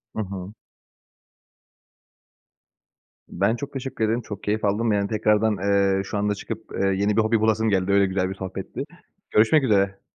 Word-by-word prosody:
Hı -, -, -3 dB
hı. 95 Hz, 0 st, -7 dB, 2.8 s
Ben 100 Hz, +4 st, +1 dB
çok 140 Hz, +3 st, -7 dB
teşekkür 130 Hz, -4 st, -2 dB
ederim, 115 Hz, +3 st, 0 dB
çok 105 Hz, -3 st, -8 dB
keyif 105 Hz, +1 st, -1 dB
aldım. 110 Hz, +3 st, +1 dB
Yani 100 Hz, -1 st, +1 dB
tekrardan, 105 Hz, 0 st, +2 dB
eee, 100 Hz, 0 st, +2 dB
şu 105 Hz, -, -4 dB
anda 105 Hz, 0 st, 0 dB
çıkıp, 110 Hz, +2 st, -7 dB
eee, 100 Hz, -, +2 dB
yeni 100 Hz, +2 st, +1 dB
bir 110 Hz, -, +6 dB
hobi 110 Hz, +1 st, +2 dB
bulasım 110 Hz, 0 st, +2 dB
geldi, 95 Hz, -1 st, +1 dB
öyle 100 Hz, 0 st, +4 dB
güzel 95 Hz, -1 st, -1 dB
bir 95 Hz, -, -5 dB
sohbetti. 95 Hz, -1 st, -6 dB, 0.5 s
Görüşmek 125 Hz, +8 st, +4 dB
üzere. 100 Hz, -5 st, +2 dB
105 Hz, 160 wpm, -24 LUFS, 100-110 Hz, 2.8 s, bir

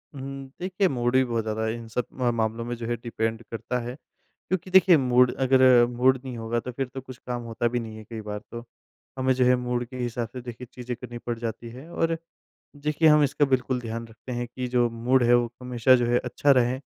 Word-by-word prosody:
हुँ, 135 Hz, 0 st, -7 dB
देखिए 190 Hz, +1 st, +1 dB
मूड 120 Hz, -4 st, 0 dB
भी 130 Hz, -, +6 dB
बहुत 115 Hz, -3 st, -1 dB
ज़्यादा 110 Hz, 0 st, -2 dB
इन 115 Hz, +1 st, -4 dB
सब 120 Hz, +2 st, -2 dB, 0.2 s
अ, 120 Hz, -1 st, +3 dB
मामलों 115 Hz, 0 st, -1 dB
में 120 Hz, 0 st, -3 dB
जो 115 Hz, -1 st, -6 dB
है 120 Hz, -, 0 dB
डिपेंड 115 Hz, -1 st, -3 dB
करता 120 Hz, +2 st, -3 dB
है 120 Hz, +1 st, -5 dB, 0.5 s
क्योंकि 185 Hz, 0 st, -1 dB
देखिए, 185 Hz, -2 st, +7 dB
मूड 125 Hz, -2 st, +4 dB
अगर 130 Hz, -2 st, +5 dB
मूड 125 Hz, +2 st, +2 dB
नहीं 130 Hz, -3 st, -6 dB
होगा 115 Hz, +1 st, -1 dB
तो 125 Hz, -, -6 dB
फिर 135 Hz, +2 st, -3 dB
तो 135 Hz, -, -5 dB
कुछ 130 Hz, -1 st, -11 dB
काम 120 Hz, -1 st, -2 dB
होता 115 Hz, +1 st, -1 dB
भी 120 Hz, +1 st, -1 dB
नहीं 110 Hz, -2 st, -7 dB
है 110 Hz, -, -9 dB
कई 110 Hz, +1 st, -7 dB
बार 105 Hz, -1 st, -5 dB
तो। 120 Hz, 0 st, -6 dB, 0.5 s
हमें 130 Hz, 0 st, +2 dB
जो 130 Hz, 0 st, +2 dB
है 125 Hz, 0 st, +5 dB
मूड 125 Hz, 0 st, -2 dB
के 130 Hz, +2 st, -10 dB
हिसाब 120 Hz, -1 st, -2 dB
से 130 Hz, -, -6 dB
देखिए 120 Hz, 0 st, -8 dB
चीज़ें 125 Hz, 0 st, -5 dB
करनी 120 Hz, -1 st, -8 dB
पड़ 120 Hz, 0 st, -4 dB
जाती 115 Hz, 0 st, -5 dB
है, 130 Hz, +7 st, -11 dB
और 165 Hz, -1 st, 0 dB, 0.6 s
देखिए, 150 Hz, +2 st, +2 dB
हम 150 Hz, 0 st, +6 dB
इसका 145 Hz, +1 st, +2 dB
बिल्कुल 130 Hz, -1 st, 0 dB
ध्यान 115 Hz, 0 st, -5 dB
रखते 115 Hz, +3 st, -10 dB
हैं 120 Hz, 0 st, -2 dB
कि 125 Hz, +1 st, -5 dB
जो 120 Hz, -1 st, +2 dB
मूड 120 Hz, +3 st, +2 dB
है 120 Hz, -, +5 dB
वो 120 Hz, -1 st, +2 dB
हमेशा 125 Hz, +1 st, +4 dB
जो 120 Hz, -1 st, 0 dB
है 120 Hz, +1 st, +3 dB
अच्छा 145 Hz, -, +1 dB
रहे 125 Hz, 0 st, +2 dB
125 Hz, 235 wpm, -26 LUFS, 115-130 Hz, 0.6 s, देखिए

